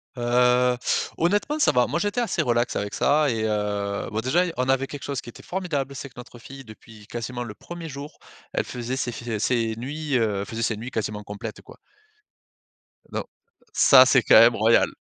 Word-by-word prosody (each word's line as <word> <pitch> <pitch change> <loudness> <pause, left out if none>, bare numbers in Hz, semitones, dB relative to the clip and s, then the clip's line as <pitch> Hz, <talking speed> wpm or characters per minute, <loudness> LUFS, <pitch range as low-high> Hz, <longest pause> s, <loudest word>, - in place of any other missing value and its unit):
Heu, 125 0 +3 0.4
honnêtement, 205 - +1
ça - - +4
va. 125 -1 +3
Moi, 170 - -1
j'étais 205 +5 -1
assez 235 - 0
relax 120 0 0
avec 100 0 -3
ça 150 +1 +3
et 115 -3 -1
heu, 105 -1 -2
bon, 110 - -2
déjà, 145 +9 +2
on 125 0 0
avait 135 0 +2
quelque 145 0 -8
chose 140 -3 -3
qui - - -11
était - - -13
formidable, 150 -7 -3
c'est 140 0 -7
que 125 - -28
notre 125 0 -11
fille 135 +3 -11
depuis 110 -1 -14
quasiment 120 +1 -5
le 110 -4 -7
1er 170 +7 -9
jour, 140 +1 -9 0.4
elle - - 0
faisait 125 +1 -4
ses 125 -2 -2
f 115 -1 -4
ses 115 0 0
nuits, 145 +4 -3
heu, 110 -4 0
elle - - -4
faisait 115 +2 -4
ses 110 -2 0
nuits 115 +4 -6
quasiment 105 -3 -3
complètes, 105 0 -7
quoi. - - -15 1.3
Don - - -3 0.5
Ça, - - +7
c'est - - +4
quand - - +7
même - - +6
royal, - - +4
125 Hz, 200 wpm, -24 LUFS, 110-140 Hz, 1.3 s, Ça